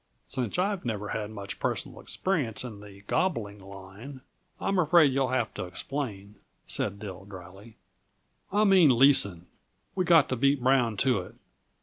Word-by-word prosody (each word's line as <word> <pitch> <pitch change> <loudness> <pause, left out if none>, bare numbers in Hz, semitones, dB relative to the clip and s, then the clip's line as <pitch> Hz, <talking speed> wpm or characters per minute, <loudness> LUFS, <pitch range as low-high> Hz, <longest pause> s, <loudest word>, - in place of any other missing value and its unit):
"Since 125 - -3
I 190 +3 +2
have 195 -3 -5
never 105 -3 -3
had 105 -1 -3
much 100 -2 -7
personal - - -3
experience 145 - -2
in 110 -5 -8
the 100 -1 -13
'gobbling' 105 - -1
line, 100 +7 -11 0.4
I'm 195 -1 0
afraid 160 -4 +5
you'll 135 -1 +1
have 125 -3 -1
to 100 - -5
explain," 100 +1 -6 0.3
said 100 0 -2
Dill 95 -3 -8
dryly. 95 +3 -12 0.8
"I 205 +2 +3
mean 180 - +5
leasing. 100 -10 +4 0.5
We 185 - 0
got 170 -5 +5
to 130 - 0
beat 140 +3 +2
Brown 125 -4 +2
to 125 -2 +2
it. 90 - -9
115 Hz, 155 wpm, -28 LUFS, 100-140 Hz, 0.8 s, afraid